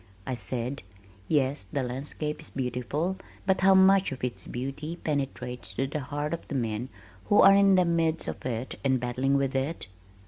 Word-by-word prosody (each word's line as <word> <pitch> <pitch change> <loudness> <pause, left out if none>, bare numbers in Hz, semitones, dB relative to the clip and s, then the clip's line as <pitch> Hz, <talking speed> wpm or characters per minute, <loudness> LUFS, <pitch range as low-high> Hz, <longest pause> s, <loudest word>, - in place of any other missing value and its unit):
I 130 - -2
said, 125 +4 -2 0.5
"Yes, 140 -2 +1
the 140 - -1
landscape 140 +4 -4
is - - -5
beautiful, 135 +8 -2 0.3
but 190 -1 +2
how 190 0 +6
much 190 -1 +5
of 130 - -7
its 125 -2 -4
beauty 135 +6 -4
penetrates 125 - -3
to 135 - 0
the 145 +3 -3
heart 145 +3 -3
of 170 - -5
the 145 - -4
men 115 0 -2 0.4
who 205 - +4
are 195 - +9
in 195 -1 +6
the 180 -1 +4
midst 165 -1 +1
of - - -5
it 125 0 -4
and 130 -2 +2
battling 130 +3 +1
with 135 -1 0
it? 135 - -2
140 Hz, 180 wpm, -28 LUFS, 125-165 Hz, 0.5 s, are